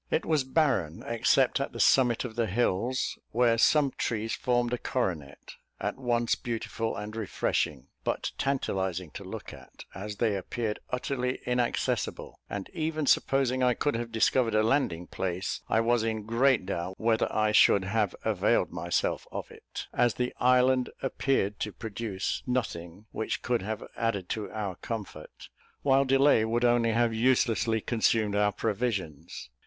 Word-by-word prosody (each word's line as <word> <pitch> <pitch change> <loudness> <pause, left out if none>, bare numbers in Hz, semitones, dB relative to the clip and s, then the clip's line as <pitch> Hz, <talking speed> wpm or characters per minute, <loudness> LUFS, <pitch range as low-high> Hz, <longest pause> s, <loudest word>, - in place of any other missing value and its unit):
It - - 0
was 155 -4 +2
barren, 130 - 0
except 115 -1 +2
at - - -3
the - - -7
summit 125 -2 +4
of 115 -3 -7
the 115 -2 0
hills, 120 +4 0
where 115 -1 +3
some 145 +2 +4
trees 115 -2 -2
formed 120 -1 0
a 125 - -1
coronet, 85 - -3 0.3
at - - -2
once 120 -2 0
beautiful 115 -2 -3
and 105 +2 -6
refreshing, 85 - -1 0.2
but - - -2
tantalising 95 - -1
to - - -8
look - - -8
at, - - -13
as 105 +2 -6
they 110 -1 +1
appeared 105 +3 -3
utterly 125 0 -2
inaccessible; 125 -1 -1
and 100 -2 -4
even 155 -2 -1
supposing 130 -1 +2
I 125 -1 +3
could 145 - 0
have 115 0 -3
discovered 115 0 +2
a 110 - +4
landing 110 - +1
place, 95 +1 -3
I 110 - +3
was 120 0 +2
in 110 -1 -2
great 115 -1 +3
doubt 95 0 -3
whether 110 0 +1
I 110 0 +2
should 100 -2 +5
have 105 +1 0
availed - - +2
myself - - -1
of - - -6
it, - - -9
as 120 -1 +2
the 125 0 -2
island 125 0 +4
appeared 130 -6 0
to 105 - -2
produce 110 -2 -4
nothing 100 -6 -3
which 110 - -3
could 120 -3 0
have 110 +3 -4
added 100 -6 -1
to 110 -2 -3
our 100 -4 -4
comfort, 115 -3 -7 0.3
while 135 0 +4
delay 135 -3 +4
would 115 +2 +1
only 120 -1 +3
have 115 0 +2
uselessly 115 -1 +2
consumed 110 -2 +1
our 105 0 +3
provisions. 100 - -3
115 Hz, 155 wpm, -28 LUFS, 105-125 Hz, 0.3 s, should